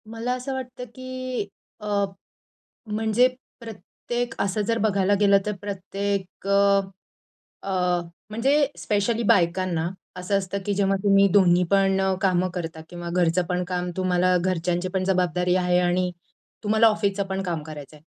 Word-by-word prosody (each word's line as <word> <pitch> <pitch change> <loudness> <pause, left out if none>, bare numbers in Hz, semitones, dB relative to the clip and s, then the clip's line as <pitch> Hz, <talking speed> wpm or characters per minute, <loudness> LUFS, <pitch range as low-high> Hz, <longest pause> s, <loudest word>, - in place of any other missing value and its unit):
मला 230 +2 -2
असं 255 +2 -4
वाटतं 255 -1 -6
की 255 -3 -4 0.3
अ, 210 - -7 1.0
म्हणजे 220 +3 +2 0.3
प्रत्येक 235 +2 -5
असं 200 +2 0
जर 230 0 +1
बघायला 200 -2 +2
गेलं 200 -1 +5
तर 210 - 0
प्रत्येक 195 -1 -4
अ, 200 0 +4 0.8
अ, 180 -2 0 0.3
म्हणजे 275 +7 +2
स्पेशली 215 +3 0
बायकांना, 180 -5 +2 0.3
असं 185 +2 0
असतं 195 0 -3
की 205 - 0
जेव्हा 195 0 +2
तुम्ही 200 0 +5
दोन्ही 180 -3 +5
पण 195 -1 +3 0.2
कामं 185 -1 +2
करता 165 -3 -5
किंवा 175 -1 -7
घरचं 175 0 +2
पण 180 0 -1
काम 180 -1 -2
तुम्हाला, 185 -1 +2
घरच्यांची 175 0 -1
पण 185 0 -1
जबाबदारी 180 -1 +1
आहे 180 -1 +2
आणि 180 0 +1 0.5
तुम्हाला 220 +2 +4
ऑफिसचं 205 -2 +1
पण 195 0 -3
काम 170 -4 -3
करायचं 150 -1 -10
आहे. 150 - -19
195 Hz, 140 wpm, -24 LUFS, 180-210 Hz, 1.0 s, गेलं